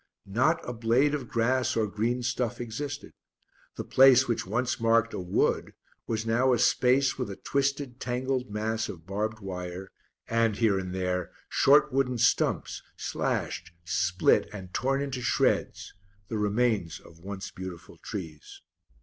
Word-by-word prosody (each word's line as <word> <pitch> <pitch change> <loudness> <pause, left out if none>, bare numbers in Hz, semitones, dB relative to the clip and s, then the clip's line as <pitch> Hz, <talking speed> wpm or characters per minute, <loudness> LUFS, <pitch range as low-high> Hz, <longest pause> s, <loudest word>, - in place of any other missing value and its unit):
Not 130 +12 +1
a 125 - -3
blade 120 +6 +2
of 140 -5 -3
grass 120 +2 +1
or 110 -1 +2
green 115 +4 -1
stuff 120 -1 -1
existed; 130 +5 -5 0.6
the - - -4
place 130 0 +6
which 115 -5 -1
once 120 +5 -1
marked 115 0 +3
a - - -3
wood 90 0 0 0.3
was 110 -1 -2
now 125 +3 +3
a - - +3
space 130 +2 +3
with 125 - -2
a 100 - -5
twisted, 140 -1 -1
tangled 125 +1 -2
mass 110 +2 -2
of 80 -3 -9
barbed 105 +3 -3
wire 90 0 -6 0.4
and, 115 -2 +2
here 105 -3 +2
and 95 -1 -5
there, 90 -1 -1 0.2
short 145 0 +4
wooden 130 -2 +1
stumps, - - +1 0.2
slashed, 85 0 -3
split, 85 0 +2
and 95 -3 -9
torn 135 +2 0
into 135 -3 -4
shreds 125 - 0 0.4
the 110 - -2
remains 105 -4 0
of 80 - -17
once 95 +2 -7
beautiful 95 -2 -9
trees. 80 -7 -8
115 Hz, 150 wpm, -28 LUFS, 95-125 Hz, 0.6 s, place